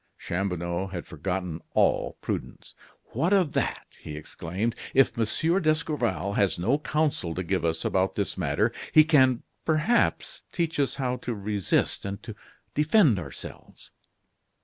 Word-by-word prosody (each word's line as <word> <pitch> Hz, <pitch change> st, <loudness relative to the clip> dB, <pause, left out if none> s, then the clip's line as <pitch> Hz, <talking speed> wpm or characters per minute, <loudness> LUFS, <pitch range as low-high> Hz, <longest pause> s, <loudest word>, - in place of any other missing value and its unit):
Chanlouineau 85 Hz, 0 st, -2 dB
had 90 Hz, -3 st, -6 dB
forgotten 90 Hz, 0 st, -4 dB
all -, -, +2 dB
prudence. -, -, -5 dB, 0.4 s
"What 165 Hz, -, +1 dB
of 185 Hz, -7 st, +3 dB
that?" -, -, -1 dB, 0.2 s
he 75 Hz, -, -7 dB
exclaimed. 90 Hz, +9 st, -3 dB, 0.2 s
"If 135 Hz, 0 st, +5 dB
Monsieur 160 Hz, -, +1 dB
d'Escorval 155 Hz, -, 0 dB
has 100 Hz, -2 st, +2 dB
no 120 Hz, +12 st, +1 dB
counsel 150 Hz, -, -1 dB
to 95 Hz, -, -2 dB
give 90 Hz, 0 st, -1 dB
us 80 Hz, -1 st, -1 dB
about 95 Hz, 0 st, +1 dB
this -, -, -1 dB
matter, -, -, +1 dB, 0.2 s
he 155 Hz, -, +8 dB
can, 130 Hz, -6 st, +4 dB, 0.2 s
perhaps, 170 Hz, -, +1 dB
teach 165 Hz, -3 st, -1 dB
us 140 Hz, -, +1 dB
how 125 Hz, -2 st, -1 dB
to 120 Hz, -2 st, -4 dB
resist 100 Hz, -2 st, 0 dB
and 100 Hz, 0 st, -5 dB
to -, -, -7 dB, 0.4 s
defend 150 Hz, -, +4 dB
ourselves." 75 Hz, -6 st, -10 dB
115 Hz, 140 wpm, -27 LUFS, 90-150 Hz, 0.4 s, he